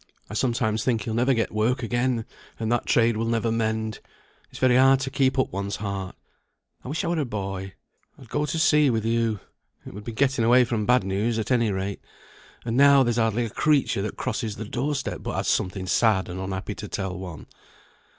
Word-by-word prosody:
"I - - -5
sometimes 115 -3 0
think 115 -4 0
he'll 110 - -3
never 125 +3 +2
get 115 - -1
work 115 +5 0
again, 120 0 0 0.3
and 110 0 -1
that 120 - 0
trade 115 -1 +3
will 115 +1 -1
never 115 0 0
mend. 110 -1 -1 0.5
It's - - -12
very 130 -1 +3
hard 135 +1 +6
to 135 0 -3
keep 130 0 +1
up 130 - 0
one's 100 +1 -3
heart. 100 -2 -5 0.7
I - - -9
wish 150 +5 -2
I - - -1
were 170 -1 0
a - - +1
boy, 95 -5 -5 0.4
I'd 130 - -14
go 150 +6 -1
to 165 - -2
sea 150 -2 +4
with 110 -3 0
you. 115 -2 0 0.5
It - - -9
would 105 +2 -8
be 115 - -5
getting 130 +1 +1
away 125 +2 +5
from 115 -3 -2
bad 125 -3 +4
news 100 +5 -1
at 110 +3 -3
any 115 -4 +2
rate; 95 +1 -3 0.6
and 115 -1 -2
now, 140 0 +6
there's 120 -1 0
hardly 115 +1 +1
a 110 - -6
creature 145 -8 +2
that 105 - -4
crosses 110 -6 -3
the 110 - -6
door 135 +7 -2
step, 135 - -4
but - - -4
has - - -2
something 95 +1 0
sad 95 +1 +2
and 90 +1 -5
unhappy 95 +2 -4
to 105 - -8
tell 95 -3 -4
one. 90 -4 -8
115 Hz, 215 wpm, -25 LUFS, 105-125 Hz, 0.7 s, hard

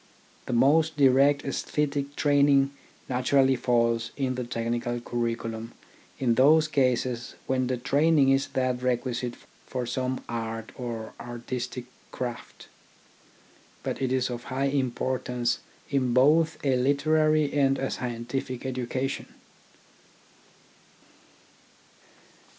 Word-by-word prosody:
The 125 - -2
most 150 +6 +3
direct 140 +1 +4
aesthetic 140 0 -2
training 140 -1 +4 0.4
naturally 130 +1 +3
falls 115 -1 +1
in 130 -2 0
the 125 0 -3
technical 120 0 -2
curriculum 115 -1 -3 0.4
in 125 -3 +2
those 155 +6 +5
cases 125 -4 0
when 130 -1 0
the 130 0 -1
training 140 +3 +3
is 135 +1 +3
that 130 -1 0
requisite 125 -1 -1 0.3
for 125 -1 -3
some 130 +1 -2
art 115 -1 -4
or 115 -3 -5
artistic 120 +1 -5 0.3
craft. 125 -2 -6 1.2
But - - -3
it 130 -1 0
is 130 -1 +1
of 120 0 -6
high 135 +1 -1
importance 125 -2 -1 0.3
in 130 -3 +1
both 155 +5 +4
a 130 -2 +3
literary 155 +3 +2
and 135 -1 +3
a 135 - -2
scientific 125 +1 -4
education. 130 +1 -3
130 Hz, 105 wpm, -27 LUFS, 120-140 Hz, 1.2 s, those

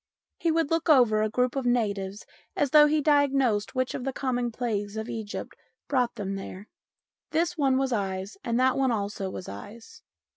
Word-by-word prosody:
He 335 - +1
would 325 -2 +1
look 330 0 0
over 240 -7 +5
a 215 - +1
group 250 +3 0
of 265 -2 -1
natives 205 -4 -1 0.3
as 285 -3 0
though 300 -1 +8
he 305 0 +2
diagnosed 275 -7 +2
which 255 0 0
of - - -4
the 270 - -1
common 245 -2 -1
plagues 215 -3 -3
of 220 +1 -4
Egypt 220 -3 -6 0.3
brought 250 -4 +1
them 195 -3 -4
there. 195 +1 -8 0.6
This 340 +2 0
one 270 -5 +2
was 265 -1 0
eyes 195 -2 -3
and 235 0 0
that 260 0 +3
one 265 -2 +2
also 200 -3 -2
was 185 - -7
eyes. 210 - -10
245 Hz, 185 wpm, -27 LUFS, 205-270 Hz, 0.6 s, though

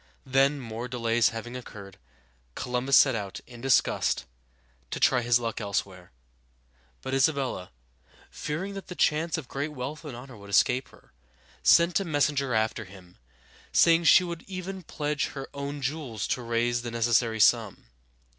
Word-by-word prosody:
Then, 135 +2 +2
more 115 -1 -6
delays 120 -2 +2
having 115 +2 -7
occurred, 100 -6 -10 0.6
Columbus 125 +2 +2
set 135 - +6
out, 100 -4 -4
in 120 -2 -13
disgust, 130 - +2 0.6
to - - -4
try 125 -2 +4
his 120 0 +3
luck 115 -1 -4
elsewhere. 95 -3 -4 0.9
But 130 - -4
Isabella, 135 - 0 0.6
fearing 170 +7 -4
that 195 -1 -8
the 180 - -7
chance 160 +1 +1
of 150 -6 -7
great 145 +4 -4
wealth 145 +4 -6
and 145 -6 -7
honor 130 0 -11
would 100 0 -13
escape 125 +5 +3
her, - - -22 0.5
sent 170 +2 +5
a - - -2
messenger 145 -6 0
after 110 0 0
him, 95 -2 -15 0.5
saying 170 0 +5
she 185 - +7
would 170 -2 -5
even 190 0 -6
pledge 150 -2 -2
her 135 -1 -7
own 140 0 -5
jewels 135 -7 -3
to 125 - -1
raise 120 +1 0
the 120 - -5
necessary 115 -1 +1
sum. 100 - +3
125 Hz, 155 wpm, -27 LUFS, 115-150 Hz, 0.9 s, she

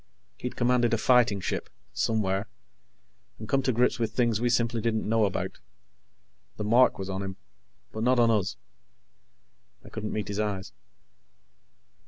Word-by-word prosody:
He'd 125 - -5
commanded 120 -1 +2
a - - -1
fighting 120 -4 +3
ship, 90 - -3 0.2
somewhere, 105 -2 0 0.9
and 110 - -8
come 135 +4 +2
to 130 -1 +1
grips 125 +1 +2
with 115 -1 -1
things 120 -3 +1
we 120 - +2
simply 120 -1 +1
didn't 110 -2 -1
know 110 0 +3
about. 95 - -3 1.0
The - - -3
mark 120 +5 +4
was 95 - -5
on 95 0 -3
him, 95 -1 -5 0.5
but 110 - -5
not 125 +2 +3
on 115 -1 +4
us. 100 - 0 1.3
I - - -11
couldn't 105 -1 -5
meet 105 -2 -3
his 100 0 -3
eyes. 100 - -3
110 Hz, 155 wpm, -27 LUFS, 105-120 Hz, 1.3 s, mark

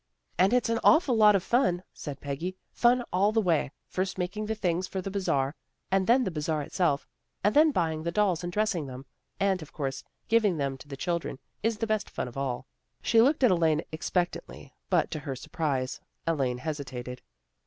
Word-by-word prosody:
" - - -43
And 185 +2 +5
it's 250 0 +3
an 230 0 +1
awful 310 -6 +5
lot 210 -2 +7
of 190 - +1
fun," 185 -8 +2
said 145 -3 -7
Peggy. 165 +7 -4
" - - -49
Fun 245 +1 +3
all 195 +3 +3
the 225 - +2
way, 165 -9 +1
first 185 +1 -2
making 195 +4 -3
the 220 - -1
things 185 -3 0
for 190 - -4
the 195 +1 -4
Bazar, 140 -9 0 0.4
and 190 0 +2
then 250 +3 +5
the 190 - -1
Bazar 155 -1 -1
itself, 145 -2 0 0.4
and 205 +2 +2
then 310 +2 +7
buying 160 - 0
the 170 +1 -2
dolls 185 -3 +1
and 175 - -3
dressing 200 -6 0
them. 130 +1 -8 0.3
And 195 -2 +2
of 155 - -10
course 135 -3 -3 0.2
giving 215 -6 +3
them 140 -2 -1
to 135 - -12
the 140 -1 -7
children 170 -2 -2 0.2
is 225 0 0
the 225 - -1
best 215 -1 -1
fun - - -4
of 120 - -10
all." 135 -3 -2 0.4
She 225 - +5
looked 275 +3 +3
at 245 - +6
Elaine 165 -3 +2
expectantly, 175 +2 -3 0.2
but, - - +2
to 155 - -3
her 140 -2 -5
surprise, 130 -1 -2 0.2
Elaine 135 -7 0
hesitated. 130 -4 -5
175 Hz, 205 wpm, -28 LUFS, 145-210 Hz, 0.4 s, lot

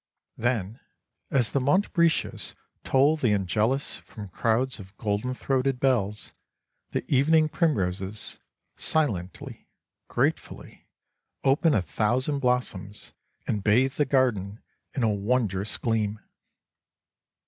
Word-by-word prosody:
Then, 115 -3 -1 0.5
as 125 -5 +2
the 140 - +1
montbretias 170 +3 +1 0.3
toll 140 +4 +3
the 120 -8 +2
Angelus 105 +7 0
from 105 -3 -10
crowds 115 +7 0
of 95 +1 -13
golden 105 +4 -2
throated 135 0 0
bells, 110 -6 0 0.6
the - - -3
evening 155 +4 +4
primroses, 100 - -1 0.4
silently, 100 - -1 0.4
gratefully, - - -2 0.6
open 145 +2 +3
a 100 - +2
thousand 130 - 0
blossoms 125 -6 -2 0.3
and 105 -2 -2
bathe 125 +6 +3
the 145 - +1
garden 115 -7 0 0.3
in 130 - 0
a 110 -2 +3
wondrous 105 -2 0
gleam. 110 -3 -1
120 Hz, 105 wpm, -26 LUFS, 105-135 Hz, 0.6 s, evening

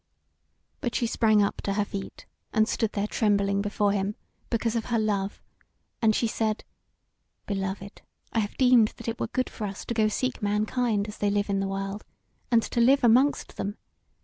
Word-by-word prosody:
But 240 - -3
she 240 - +1
sprang 215 -2 +3
up 200 - -2
to 200 - -1
her 205 0 +1
feet, 195 -1 -7 0.3
and 220 0 +3
stood 225 -1 -1
there 200 0 0
trembling 200 -2 +1
before 205 0 +1
him, 200 +1 -1 0.3
because 230 0 0
of 230 - -1
her 240 - 0
love; 205 -2 -1 0.6
and 220 -2 +4
she - - +1
said: 220 -1 -1 0.8
"Beloved, 195 0 -4 0.3
I 230 - +2
have 205 -1 -3
deemed 250 -4 +5
that - - -9
it 230 0 -3
were - - -1
good 255 -1 -1
for 210 - -5
us 195 0 -7
to - - -2
go 220 -2 +3
seek 255 +4 -2
mankind 210 +1 0
as 210 - -9
they 205 - +2
live 205 0 0
in 195 - +1
the 195 - -1
world, 195 +1 -4 0.5
and 230 -2 +4
to 235 - 0
live 270 +3 +5
amongst 255 +5 +3
them. 205 +2 -3
215 Hz, 190 wpm, -27 LUFS, 200-230 Hz, 0.8 s, deemed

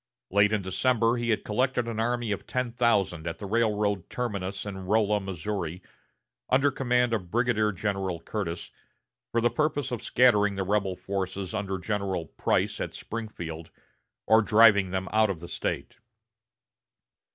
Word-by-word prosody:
Late 100 +2 +4
in 105 -3 0
December 115 +4 +2
he 120 0 -2
had 110 - +1
collected 120 +2 0
an 115 -2 -3
army 120 -1 0
of 100 - -4
ten 125 -2 -1
thousand 100 -9 +1
at 85 - -3
the 105 - -7
railroad 105 -3 0
terminus 100 -5 -3
at 100 - -4
Rolla, 105 +2 +1
Missouri, 95 -2 -4 0.7
under 135 +2 +4
command 125 -3 +1
of 95 -6 -2
Brigadier 110 -1 +2
General 95 -3 -2
Curtis, 85 -1 -4 0.6
for 115 - +1
the 120 - +3
purpose 150 -3 0
of 120 - -3
scattering 105 -5 +4
the 95 - -1
rebel 100 -1 0
forces 95 0 -4
under 100 -3 -2
General 95 -3 -2
Price - - -1
at - - -4
Springfield 85 -8 -6 0.6
or 110 0 +6
driving 105 -3 +5
them 95 +1 -2
out 110 0 +4
of 95 -4 -3
the 85 - -9
State. - - -4
105 Hz, 150 wpm, -27 LUFS, 95-115 Hz, 0.7 s, or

